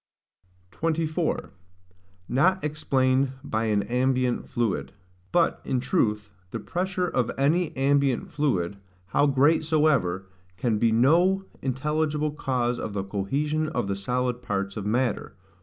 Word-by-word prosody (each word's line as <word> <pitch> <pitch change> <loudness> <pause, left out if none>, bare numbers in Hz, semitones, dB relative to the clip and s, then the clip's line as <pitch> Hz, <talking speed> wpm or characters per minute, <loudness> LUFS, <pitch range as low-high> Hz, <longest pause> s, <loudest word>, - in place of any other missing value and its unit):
24. 160 - -1 0.8
Not 185 +9 +2
explained 135 -3 +1
by 110 +1 -1
an 105 -2 +1
ambient 125 0 0
fluid. 115 -4 -1 0.4
But, 170 -2 +2
in 130 -2 0
truth, 105 - 0 0.2
the 115 - -4
pressure 180 - -2
of 125 -8 0
any 155 +5 +2
ambient 140 -1 +2
fluid, 100 - 0 0.3
how 145 - +3
great 145 +4 +3
soever, 140 - +2 0.3
can 110 +1 0
be 115 0 +3
no 175 +11 +4 0.2
intelligible 150 +3 0
cause 125 -4 -1
of 105 - -4
the 100 -1 -2
cohesion 145 +11 -1
of 155 - -1
the 100 0 -2
solid 125 +4 -1
parts 100 -3 -2
of 105 -1 -4
matter. 120 +1 -1
130 Hz, 125 wpm, -26 LUFS, 110-155 Hz, 0.8 s, no